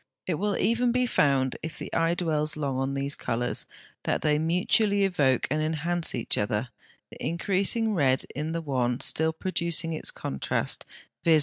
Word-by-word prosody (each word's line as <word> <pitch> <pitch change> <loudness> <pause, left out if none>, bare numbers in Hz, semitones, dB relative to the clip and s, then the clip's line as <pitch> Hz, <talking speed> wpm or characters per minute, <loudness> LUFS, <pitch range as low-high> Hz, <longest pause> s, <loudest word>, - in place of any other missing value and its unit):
It 170 -5 -1
will 205 +1 0
even 240 +2 +2
be 250 +1 +2
found, 135 - +2
if 160 - -6
the - - -7
eye 165 +1 +2
dwells 155 -3 0
long 140 -3 -1
on 135 +1 -1
these 140 +1 -2
colours, 120 +1 -2 0.3
that - - -1
they 150 -1 +3
mutually 195 +5 +2
evoke 145 -10 +2
and 155 +1 +1
enhance 160 +2 0
each - - +1
other, 105 +4 -1 0.4
the - - -10
increasing 200 +6 +2
red 135 -7 +2
in 150 +3 -3
the 165 0 -2
one 125 -4 0
still 160 +1 +2
producing 170 -1 -1
its 155 - -1
contrast, 70 - -2 0.4
viz. 160 -2 +5
160 Hz, 170 wpm, -27 LUFS, 140-180 Hz, 0.4 s, viz